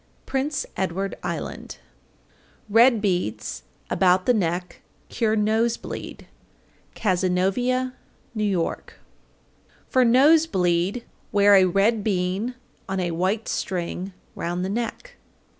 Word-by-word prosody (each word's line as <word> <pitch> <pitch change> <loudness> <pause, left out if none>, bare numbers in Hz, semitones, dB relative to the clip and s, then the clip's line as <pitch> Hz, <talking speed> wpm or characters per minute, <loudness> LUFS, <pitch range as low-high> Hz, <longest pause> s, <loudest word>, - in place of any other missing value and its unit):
Prince 275 +2 -1
Edward 190 +1 -2
Island. - - -5 0.9
801. 205 - -12
Red 235 -1 +6
beads 180 - -2 0.2
about 185 0 +3
the 250 - +4
neck 180 -3 -2 0.3
cure 220 -2 0
nose 220 +2 +1
bleed. - - -8 0.7
Cazenovia, 195 +7 0 0.4
N.Y. 215 -1 0
802. 165 - -4 0.9
For 255 - +3
nose 290 +7 +5
bleed 180 - 0 0.3
wear 205 -1 +5
a 190 -1 +7
red 200 +4 +2
bean 195 +4 -1 0.3
on 190 0 -1
a 175 -2 -1
white 190 +6 -1
string 185 +1 -3 0.2
round 175 +2 -3
the - - -3
neck. 240 - -4
200 Hz, 110 wpm, -24 LUFS, 180-235 Hz, 0.9 s, a